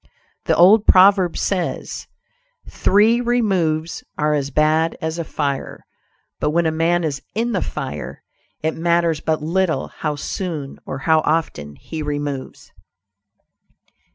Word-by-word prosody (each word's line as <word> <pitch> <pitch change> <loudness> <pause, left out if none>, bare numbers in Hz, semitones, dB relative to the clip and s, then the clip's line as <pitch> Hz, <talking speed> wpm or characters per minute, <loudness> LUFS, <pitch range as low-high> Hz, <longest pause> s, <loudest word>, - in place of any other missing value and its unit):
The - - +2
old 200 +5 +6
proverb 190 -2 +5
says, 185 -3 -3 0.6
"Three 220 +5 +3
removes 185 -10 0
are 150 0 +1
as 140 -2 -1
bad 155 +2 +2
as 160 0 -3
a - - -1
fire," 140 -3 -4 0.5
but - - 0
when 170 +2 +1
a 160 - +2
man 170 +2 +1
is 145 -4 -2
in 235 +2 0
the 195 - 0
fire, 130 - -6 0.4
it 160 - 0
matters 170 -1 +1
but 155 0 -1
little 175 +1 0
how 150 -2 -3
soon 150 -2 -5
or 135 - -4
how 160 -1 +4
often 150 - -2
he 160 - -7
removes. 145 -2 -5
160 Hz, 130 wpm, -20 LUFS, 150-180 Hz, 0.6 s, old